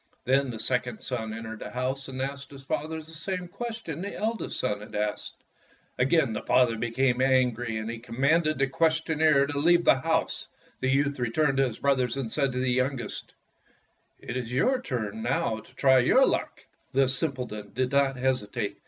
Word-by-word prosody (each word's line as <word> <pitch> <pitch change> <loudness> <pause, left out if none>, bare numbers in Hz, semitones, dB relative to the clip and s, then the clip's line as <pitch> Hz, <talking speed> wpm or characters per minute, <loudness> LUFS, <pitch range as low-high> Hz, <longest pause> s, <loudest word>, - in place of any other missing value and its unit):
Then 135 +1 +2
the 115 - -5
second 125 0 -1
son 115 -4 -3
entered 110 0 -6
the - - -6
house 130 +2 -3
and 130 0 -4
asked 140 +1 -5
his 135 -1 -12
father 155 +3 -2
the 160 0 -10
same 180 +3 -4
question 220 -6 -6
the 200 +1 -5
eldest 225 +2 -2
son 105 0 -1
had 105 - -10
asked. 105 0 -3 0.6
Again 135 -2 +3
the 105 - -3
father 125 -2 +3
became 125 +3 +1
an 130 -1 +4
gry, 115 0 -4
and 110 0 -3
he 115 0 -5
commanded 155 +7 +1
the 135 - +3
questioner 160 0 +2
to 145 0 -3
leave 175 +3 +4
the 130 - +5
house. 160 +3 -1 0.3
The 130 - 0
youth 140 +1 +1
returned 135 +4 +1
to 135 -1 +4
his 115 - -6
brothers 130 -3 +1
and 125 -5 -3
said 140 -3 +1
to - - -4
the 130 0 +1
youngest, 130 -2 -2 0.8
"It 120 - -6
is 125 -2 -3
your 250 - +2
turn 110 - -4
now 115 -2 0
to 125 - -17
try 130 -1 +5
your 255 - +5
luck." - - -2 0.3
The 135 0 +4
simpleton 125 -5 -1
did 130 0 0
not 140 -1 +3
hesitate. 125 -6 -1
130 Hz, 190 wpm, -27 LUFS, 120-145 Hz, 0.8 s, the